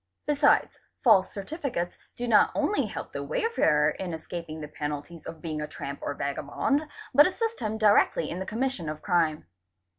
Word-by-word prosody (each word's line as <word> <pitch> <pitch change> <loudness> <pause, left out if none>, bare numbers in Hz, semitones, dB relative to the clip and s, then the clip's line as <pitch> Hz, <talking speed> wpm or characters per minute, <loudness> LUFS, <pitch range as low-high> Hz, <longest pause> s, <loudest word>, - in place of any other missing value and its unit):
Besides, 290 0 +3 0.2
false 195 -6 +5
certificates 210 - -4 0.2
do 245 - -4
not 225 - +5
only 420 - +1
help - - -7
the - - -3
wayfarer 165 - +2
in 175 -1 -4
escaping 160 -1 -7
the 150 - -6
penalties 150 +2 -6
of 160 - -9
being 155 -2 -3
a 150 - -3
tramp 140 -1 -6
or 145 - -3
vagabond, 150 - -1 0.3
but 295 +5 +8
assist 450 +4 -2
him 220 -1 -2
directly 205 -6 +4
in 175 - -4
the 190 - -5
commission 225 -8 -2
of 155 0 -6
crime. 165 - +1
175 Hz, 170 wpm, -27 LUFS, -, 0.3 s, but